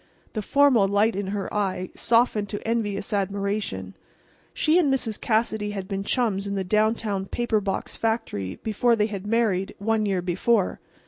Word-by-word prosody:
The 215 - -2
formal 255 -3 +4
light 205 +2 +2
in 200 0 -2
her 200 0 -3
eye 185 -3 -1
softened 230 -3 +2
to 205 - -5
envious 210 -3 -1
admiration. 200 - -2 0.6
She 320 +3 +3
and 295 -6 +3
Mrs. 230 -5 -1
Cassidy 220 -2 0
had 195 -2 -5
been 195 0 -3
chums 205 -4 0
in 200 - -2
the 195 - -1
downtown 210 0 0
paper 235 -2 0
box 195 -1 -3
factory 220 - -2
before 230 +2 +2
they 210 -2 +2
had 205 -2 -5
married, 210 -4 +1
one 215 +1 0
year 190 -3 0
before. 185 +4 +1
210 Hz, 165 wpm, -25 LUFS, 195-225 Hz, 0.6 s, formal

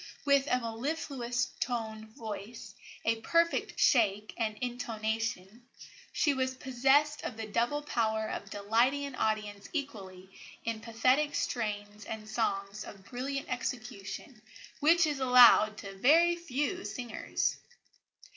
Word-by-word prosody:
With 280 -1 +4
a 250 - +2
mellifluous 250 +1 -2
toned 220 -3 -3
voice, 220 -2 -7 0.3
a 225 0 +2
perfect 335 +7 +1
shake 210 -4 +3
and 215 -2 -2
intonation, 225 -2 -3 0.4
she 290 - +2
was 260 -1 -1
possessed 270 +4 +2
of 225 - -5
the 225 - -4
double 240 +7 0
power 220 -5 0
of 200 -2 -5
delighting 230 +8 +1
an 280 - -6
audience 210 -3 -2
equally 195 - -5 0.4
in 230 -1 -2
pathetic 255 +6 +2
strains 210 -2 -3
and 215 -1 -6
songs 210 -2 -2
of 195 -2 -12
brilliant 270 +5 -4
execution, 245 -1 -5 0.4
which 325 +3 +5
is 295 -3 -1
allowed 245 -4 +7
to 200 -2 -8
very 335 - +5
few 340 +3 -2
singers." 240 -4 -2
235 Hz, 120 wpm, -31 LUFS, 215-275 Hz, 0.4 s, allowed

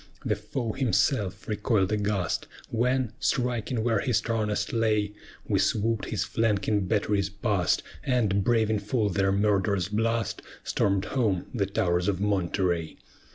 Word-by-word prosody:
The - - +1
foe 120 -4 -3
himself 110 -6 0
recoil'd 105 -2 +1
aghast, 105 -5 -1 0.2
When, 125 0 +1
striking 120 -2 0
where 115 -3 +2
he 125 - -1
strongest 110 -2 0
lay, 105 -3 +1 0.3
We 100 -3 +2
swoop'd 110 +3 +1
his 105 -5 -1
flanking 105 -3 0
batteries 100 -2 +1
past, 100 -4 0 0.2
And 110 -7 +1
braving 110 -2 +2
full 105 +1 0
their 95 +1 +1
murderous 100 -2 +1
blast, 115 +2 0 0.2
Storm'd 100 0 +1
home 110 -9 0
the 100 -6 0
towers 90 -3 +1
of 95 -3 0
Monterey. 90 -4 0
105 Hz, 130 wpm, -27 LUFS, 100-115 Hz, 0.3 s, where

